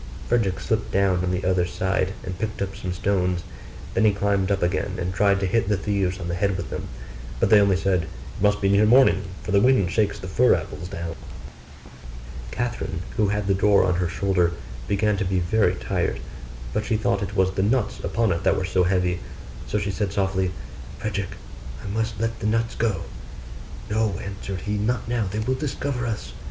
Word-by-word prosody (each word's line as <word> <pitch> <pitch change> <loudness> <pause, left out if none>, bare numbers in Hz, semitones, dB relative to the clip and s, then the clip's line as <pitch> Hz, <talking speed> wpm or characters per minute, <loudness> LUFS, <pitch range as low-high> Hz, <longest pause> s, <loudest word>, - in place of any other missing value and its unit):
Frederick 105 -6 +1
slipped 110 -1 -1
down 95 -2 +2
on 90 - 0
the 90 +1 -1
other 90 -1 +2
side, 95 +1 0
and 90 -1 -6
picked 110 +1 -3
up 95 -1 -3
some 90 - -4
stones. 90 -1 0 0.5
Then - - +2
he 110 - +6
climbed 100 -1 +1
up 100 -2 +1
again, 90 +1 0
and 90 0 -2
tried 100 +1 +3
to - - +1
hit 105 +2 +1
the 105 - +2
thieves 100 -1 -1
on 85 - -4
the 85 - -2
head 95 +2 +1
with - - -5
them: - - -4 0.5
but - - +2
they 105 -1 +8
only 100 -2 +3
said, 95 -3 +1
'It 80 - -11
must 105 0 +3
be 100 - +3
near 100 +2 +5
morning, 115 -6 +6 0.2
for - - -4
the 100 - +5
wind 125 -8 +4
shakes 105 -1 +1
the 95 - -7
fir 90 - +4
apples 80 +4 -5
down.' 85 -3 -5 1.3
Catherine, 115 - -3
who 105 - +3
had 105 +1 -1
the 100 - +2
door 100 +1 +4
on 90 - +2
her 90 - +1
shoulder, 90 -1 +1 0.3
began 105 0 +1
to 100 - 0
be 95 0 0
very 100 +5 +2
tired; - - -1 0.5
but 105 - 0
she 110 0 0
thought 100 -2 0
it 100 0 -4
was 95 -1 +3
the 95 - -1
nuts 120 +6 +1
upon 115 -3 0
it 85 +1 -1
that - - +3
were 95 - -1
so 90 0 +2
heavy: 90 -1 +1 0.5
so - - 0
she 100 -1 -1
said 100 0 -2
softly, 95 -2 0 0.5
'Frederick, 100 -3 -3 0.5
I - - -6
must 110 0 -2
let 115 0 -1
the 105 - -1
nuts 115 +1 +1
go.' 110 -4 0 0.9
'No,' 105 -3 0
answered 100 -1 -5
he, 105 +2 -2
'not 115 +3 -1
now, 115 -4 0
they 105 - -4
will 110 +4 0
discover 130 -2 -2
us. 105 - -4
100 Hz, 205 wpm, -24 LUFS, 95-105 Hz, 1.3 s, they